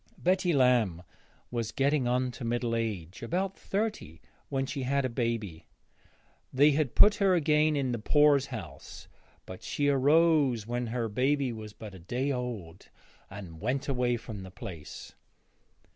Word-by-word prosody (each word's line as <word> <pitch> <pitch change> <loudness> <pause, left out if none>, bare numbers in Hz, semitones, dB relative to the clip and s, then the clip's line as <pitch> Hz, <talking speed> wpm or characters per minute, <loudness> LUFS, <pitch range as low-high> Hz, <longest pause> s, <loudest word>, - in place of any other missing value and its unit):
Betty 185 0 +1
Lamb 120 - +2 0.5
was 115 -3 -2
getting 140 -1 +1
on 125 +1 +1
to 125 - -9
middle 120 0 -1
age, 100 -7 -4
about 185 +10 -2
thirty, 200 - -3 0.3
when 135 -1 -1
she 135 0 -4
had 135 +1 0
a - - 0
baby. 115 -9 -3 0.8
They 145 +3 +5
had 145 -3 0
put 210 - +7
her 195 -2 +3
again 155 -1 +3
in 135 -3 0
the 120 - -2
poorshouse, 135 - 0 0.4
but 95 - -9
she 145 0 -1
rose 140 -4 +3
when 120 +1 -3
her 115 0 -2
baby 130 +3 0
was 110 -2 -8
but 105 -1 -10
a 95 - -11
day 125 +11 -2
old 115 -10 -5 0.4
and 95 -5 -10
went 130 +5 -1
away 125 -3 +1
from 110 -3 -8
the 95 - -9
place. 85 -4 -9
125 Hz, 150 wpm, -29 LUFS, 110-145 Hz, 0.8 s, put